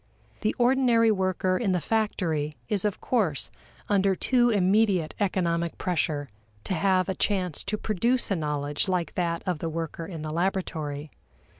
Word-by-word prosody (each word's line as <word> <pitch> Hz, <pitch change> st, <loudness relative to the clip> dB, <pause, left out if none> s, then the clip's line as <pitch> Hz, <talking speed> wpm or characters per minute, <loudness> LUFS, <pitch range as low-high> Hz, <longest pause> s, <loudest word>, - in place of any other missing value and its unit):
The 215 Hz, -, 0 dB
ordinary 240 Hz, -2 st, +4 dB
worker 185 Hz, -2 st, +1 dB
in 200 Hz, -6 st, +1 dB
the 180 Hz, -, +2 dB
factory 165 Hz, -8 st, -1 dB
is 210 Hz, -3 st, -1 dB
of 205 Hz, -, -1 dB
course 195 Hz, -, 0 dB, 0.4 s
under 195 Hz, -1 st, +3 dB
too 245 Hz, +4 st, +3 dB
immediate 195 Hz, -4 st, +2 dB
economic 170 Hz, -4 st, 0 dB
pressure 155 Hz, -5 st, -1 dB, 0.4 s
to -, -, -3 dB
have 185 Hz, +1 st, +2 dB
a 190 Hz, -, 0 dB
chance 185 Hz, -4 st, 0 dB
to 215 Hz, +2 st, -1 dB
produce 230 Hz, +4 st, 0 dB
a -, -, +3 dB
knowledge 150 Hz, 0 st, -2 dB
like 180 Hz, -3 st, -1 dB
that 170 Hz, -2 st, -1 dB
of 180 Hz, -5 st, -1 dB
the 165 Hz, -, -2 dB
worker 165 Hz, 0 st, -4 dB
in 165 Hz, -4 st, -6 dB
the 155 Hz, 0 st, -4 dB
laboratory. 160 Hz, -5 st, -2 dB
185 Hz, 155 wpm, -27 LUFS, 165-210 Hz, 0.4 s, ordinary